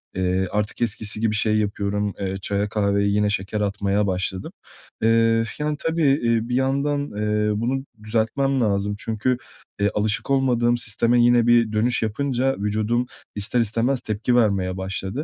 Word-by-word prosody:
eee, 95 0 0
artık 105 +2 -2
eskisi 105 -2 -1
gibi 110 -1 +1
şey 110 -1 +2
yapıyorum, 105 -1 -1
eee, 95 -1 -3
çaya, 100 +1 -1
kahveye 100 -1 +1
yine 105 0 +2
şeker 100 +1 -2
atmaya 100 0 0
başladım. 95 0 -2 0.5
Eee, 115 0 +3 0.2
yani, 150 0 -1
tabii, 165 0 -1 0.2
eee, 115 0 +1
bir 125 - 0
yandan, 140 +2 +1
eee, 105 0 0
bunu 135 +3 -1 0.2
düzeltmem 120 +5 0
lazım 100 -1 0
çünkü, 115 +4 -1 0.4
eee, 100 0 +2
alışık 105 +4 -1
olmadığım 120 -3 +2
sisteme 120 +1 +2
yine 120 -1 +4
bir 120 -2 +4
dönüş 115 +3 +1
yapınca 135 +3 0
vücudum 110 +4 0 0.3
ister 105 +4 0
istemez 115 +4 0
tepki 110 +3 -1
vermeye 95 -5 +1
başladı. 95 +8 -4
110 Hz, 150 wpm, -23 LUFS, 100-120 Hz, 0.5 s, yine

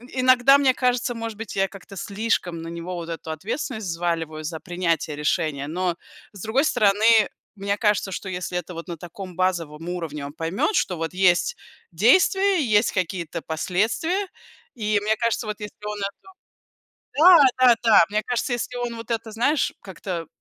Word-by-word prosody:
иногда, 255 +1 +6
мне 270 -2 +3
кажется, 250 -1 0
может 230 -2 -5
быть 225 -2 -7
я 195 0 +2
как-то 195 0 -12
слишком 200 -5 -2
на 165 - -7
него 170 +2 -6
вот 170 -1 -6
эту 165 -1 -5
ответственность 215 - -4
взваливаю 165 -2 -2
за 160 +1 -5
принятие 170 -4 -1
решения, 150 -2 -1
но 175 +2 -1 0.4
с 195 - -9
другой 225 +8 +1
стороны, 220 -2 +4 0.3
мне 200 0 -2
кажется, 210 -2 +1
что 190 - -5
если 180 -1 -3
это 180 +1 -5
вот 165 +2 -7
на 170 -2 -6
таком 180 +2 -9
базовом 170 -3 -1
уровне 160 -5 -4
он 140 - -8
поймет, 165 - -1
что 180 - 0
вот 165 +1 -4
есть 185 - +2 0.3
действия, 375 - +4
и, - - +1
есть 210 - +2
какие-то 170 -3 -3
последствия 220 - -1 0.5
и 210 -3 +1
мне 215 +1 +1
кажется, 230 -1 -1
вот 210 0 -4
если 210 - -7
он 210 0 -4
это 200 - -5 0.9
Да, 350 +2 +9 0.3
да, 240 - +8
да, 225 -5 +7
мне 215 +1 0
кажется, 245 +1 -1
если 240 +1 -4
он 240 -1 -3
вот 230 +1 -9
это, 225 -1 -3
знаешь, 245 +6 +1
как-то 185 -3 -6
195 Hz, 175 wpm, -23 LUFS, 170-230 Hz, 0.9 s, Да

